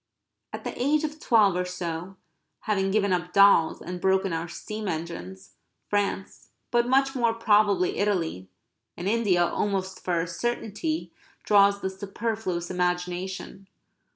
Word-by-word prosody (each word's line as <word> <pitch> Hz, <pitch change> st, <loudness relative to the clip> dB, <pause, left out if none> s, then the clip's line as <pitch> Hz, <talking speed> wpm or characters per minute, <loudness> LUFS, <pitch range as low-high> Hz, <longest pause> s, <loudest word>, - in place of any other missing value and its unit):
At -, -, -7 dB
the -, -, -4 dB
age 295 Hz, +4 st, +2 dB
of 310 Hz, 0 st, -4 dB
twelve 215 Hz, -9 st, +4 dB
or 180 Hz, -, 0 dB
so, 180 Hz, 0 st, -5 dB, 0.5 s
having 195 Hz, -3 st, 0 dB
given 200 Hz, -1 st, +2 dB
up 175 Hz, 0 st, -2 dB
dolls 200 Hz, -5 st, +5 dB
and 180 Hz, 0 st, -6 dB
broken 190 Hz, -1 st, +2 dB
our 165 Hz, +1 st, -2 dB
steam 215 Hz, +5 st, -6 dB
engines, 155 Hz, -, -6 dB, 0.4 s
France, 200 Hz, -1 st, -2 dB, 0.2 s
but 240 Hz, 0 st, +2 dB
much 270 Hz, +1 st, +3 dB
more 235 Hz, -3 st, +1 dB
probably 205 Hz, -5 st, +2 dB
Italy, 165 Hz, -, -1 dB, 0.5 s
and 175 Hz, -, -4 dB
India 200 Hz, -5 st, +3 dB
almost 190 Hz, 0 st, -2 dB
for 175 Hz, -2 st, 0 dB
a 165 Hz, -, 0 dB
certainty, 240 Hz, -, -3 dB, 0.3 s
draws 200 Hz, -1 st, +4 dB
the 190 Hz, -, -1 dB
superfluous 195 Hz, -2 st, -3 dB
imagination. 180 Hz, +2 st, -3 dB
195 Hz, 135 wpm, -26 LUFS, 180-215 Hz, 0.5 s, dolls